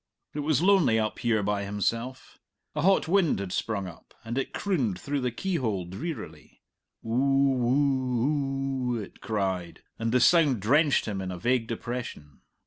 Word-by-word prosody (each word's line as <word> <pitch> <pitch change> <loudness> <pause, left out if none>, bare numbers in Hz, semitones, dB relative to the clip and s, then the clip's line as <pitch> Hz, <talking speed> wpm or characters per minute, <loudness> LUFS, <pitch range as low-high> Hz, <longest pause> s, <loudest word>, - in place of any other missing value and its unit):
It 150 - -4
was 150 0 +1
lonely 185 - +4
up 110 -1 -1
here 110 -3 +1
by 100 0 0
himself. 115 +6 -3 0.3
A 150 - -2
hot 190 +1 +3
wind 180 -2 +3
had 95 -2 -4
sprung 100 -2 -2
up, 90 -3 -12
and 115 +1 -4
it 135 - -2
crooned 130 - -1
through 145 -1 -2
the 125 - 0
keyhole 120 - -2
drearily; 95 - -7 0.4
"oo - - -6
woo 135 0 +1
oo," - - -2
it 105 - -10
cried, 95 -5 -2 0.2
and 115 0 -1
the 125 - +4
sound 145 -3 +4
drenched 145 - +3
him 100 -3 -3
in 95 -1 -4
a 90 - -5
vague 120 +3 +1
depression. 115 - -6
125 Hz, 160 wpm, -27 LUFS, 105-140 Hz, 0.4 s, lonely